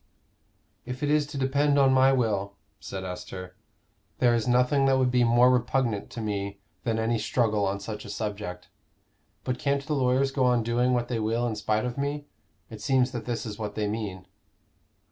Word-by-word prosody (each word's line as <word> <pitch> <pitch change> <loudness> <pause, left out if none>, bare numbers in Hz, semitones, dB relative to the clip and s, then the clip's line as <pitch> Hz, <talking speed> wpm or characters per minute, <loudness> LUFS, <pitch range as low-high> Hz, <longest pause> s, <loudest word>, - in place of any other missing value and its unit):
"If 125 +3 -6
it 145 - +1
is 150 -1 +2
to 145 -1 -7
depend 140 +2 +2
on 135 -1 +5
my 130 +1 +5
will," 105 -6 0 0.3
said 95 -1 -6
Esther, 90 0 -7 0.6
"there 120 -1 +4
is 115 -1 0
nothing 125 +3 +3
that 135 -1 +4
would 130 -1 +2
be 125 -1 +3
more 120 +2 +5
repugnant 120 -3 0
to 115 - -6
me 100 -2 -3 0.2
than 115 -2 0
any 110 +1 0
struggle 110 -2 +1
on 100 +1 -2
such 105 +1 -6
a - - -10
subject. 100 -4 -5 0.8
But 125 -1 -2
can't 140 0 0
the 155 - -2
lawyers 135 0 +2
go 135 -1 0
on 125 -2 +3
doing 120 +2 +1
what 120 -1 0
they 120 -2 -2
will 115 +2 0
in 115 -2 -1
spite 105 +2 0
of 125 +2 -4
me? 145 +1 -2 0.5
It 110 -2 -9
seems 130 +2 +2
that 120 -4 -5
this 120 -1 -3
is 105 -1 -6
what 105 -1 -4
they 105 -1 -1
mean." 105 -4 -4
120 Hz, 195 wpm, -27 LUFS, 105-130 Hz, 0.8 s, on